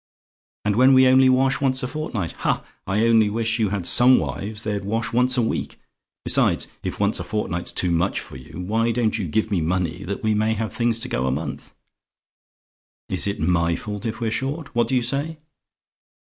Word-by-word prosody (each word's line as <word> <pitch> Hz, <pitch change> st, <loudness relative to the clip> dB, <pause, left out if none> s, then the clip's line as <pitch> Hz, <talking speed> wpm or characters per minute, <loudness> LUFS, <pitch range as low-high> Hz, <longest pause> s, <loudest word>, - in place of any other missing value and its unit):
"And 105 Hz, -1 st, +1 dB
when 130 Hz, +2 st, +6 dB
we 130 Hz, 0 st, +6 dB
only 130 Hz, 0 st, +5 dB
wash 135 Hz, +1 st, +2 dB
once 130 Hz, -1 st, +1 dB
a -, -, -1 dB
fortnight! 125 Hz, -, -4 dB
Ha! -, -, -1 dB, 0.2 s
I 105 Hz, +4 st, +1 dB
only 110 Hz, -2 st, +4 dB
wish 115 Hz, +2 st, -1 dB
you 110 Hz, -3 st, +1 dB
had 100 Hz, -3 st, -3 dB
some 125 Hz, +7 st, +6 dB
wives, 95 Hz, +10 st, -3 dB
they'd 105 Hz, -2 st, -3 dB
wash 115 Hz, +4 st, -2 dB
once 125 Hz, +2 st, +3 dB
a 120 Hz, -, +2 dB
week! 115 Hz, -, -3 dB, 0.5 s
Besides, -, -, +2 dB
if -, -, -5 dB
once -, -, +1 dB
a -, -, -3 dB
fortnight's 90 Hz, -5 st, -3 dB
too 90 Hz, -, +2 dB
much 85 Hz, +3 st, 0 dB
for -, -, -11 dB
you, 65 Hz, +7 st, -9 dB
why 110 Hz, +5 st, 0 dB
don't 115 Hz, -1 st, 0 dB
you 95 Hz, -, -3 dB
give 110 Hz, +7 st, -1 dB
me 95 Hz, -5 st, +1 dB
money 85 Hz, 0 st, -2 dB
that 100 Hz, +2 st, -5 dB
we 110 Hz, 0 st, +2 dB
may 110 Hz, +1 st, +1 dB
have 110 Hz, -2 st, -4 dB
things 115 Hz, -1 st, +1 dB
to 125 Hz, -, -2 dB
go 65 Hz, -, -2 dB
a -, -, +1 dB
month? 75 Hz, +5 st, -6 dB, 1.3 s
Is -, -, +2 dB
it 100 Hz, -, -3 dB
MY 85 Hz, +1 st, +1 dB
fault 105 Hz, +4 st, -6 dB
if 110 Hz, +1 st, -5 dB
we're 115 Hz, -2 st, -2 dB
short? 140 Hz, +6 st, -3 dB
What 120 Hz, -1 st, +1 dB
do 130 Hz, -, 0 dB
you 125 Hz, -, +1 dB
say? 140 Hz, +6 st, -2 dB
110 Hz, 205 wpm, -22 LUFS, 95-125 Hz, 1.3 s, when